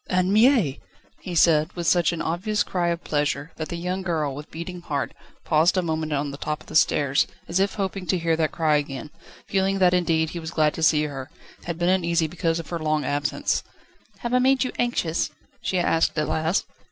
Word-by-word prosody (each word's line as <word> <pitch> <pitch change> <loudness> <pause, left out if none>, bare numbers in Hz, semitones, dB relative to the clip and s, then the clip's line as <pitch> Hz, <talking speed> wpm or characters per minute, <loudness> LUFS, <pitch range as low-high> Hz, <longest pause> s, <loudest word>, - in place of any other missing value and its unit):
"Anne 185 +1 +2
Mie!" 220 - +4 0.4
he 180 - -6
said, 160 0 +4
with 175 -1 -4
such 175 -1 +3
an 170 - -3
obvious 205 +6 0
cry 175 -2 -1
of 170 0 -1
pleasure, 145 0 -1
that 155 -2 -4
the - - -3
young 180 +2 -3
girl, 160 -6 -1
with 145 +2 -9
beating 175 +2 -7
heart, 145 -5 -3 0.3
paused 165 +4 +3
a 185 - +2
moment 160 -1 -2
on 145 0 -1
the 140 - -9
top 150 0 -3
of - - -15
the - - -9
stairs, 140 -3 +3 0.2
as 175 +3 0
if 195 0 +1
hoping 195 -2 -3
to 185 - +2
hear 165 -1 +1
that 160 -1 0
cry 155 -3 +2
again, 145 0 -5 0.3
feeling 195 0 +1
that 180 -2 +4
indeed 165 -3 +1
he 175 - -5
was 160 -1 -6
glad 155 -2 +2
to - - -6
see 155 -1 +4
her, 140 -2 -5 0.4
had 170 -1 -3
been 175 0 0
uneasy 170 -3 +2
because 165 0 -1
of 165 - -6
her 170 - -3
long 155 -1 0
absence. 145 0 0 0.6
"Have 240 0 -3
I 250 - +5
made 265 +1 +3
you 255 - -2
anxious?" 180 -11 0 0.3
she 185 - -1
asked 165 -2 +2
at 150 - +1
last. 160 +4 0
165 Hz, 215 wpm, -24 LUFS, 155-180 Hz, 0.6 s, I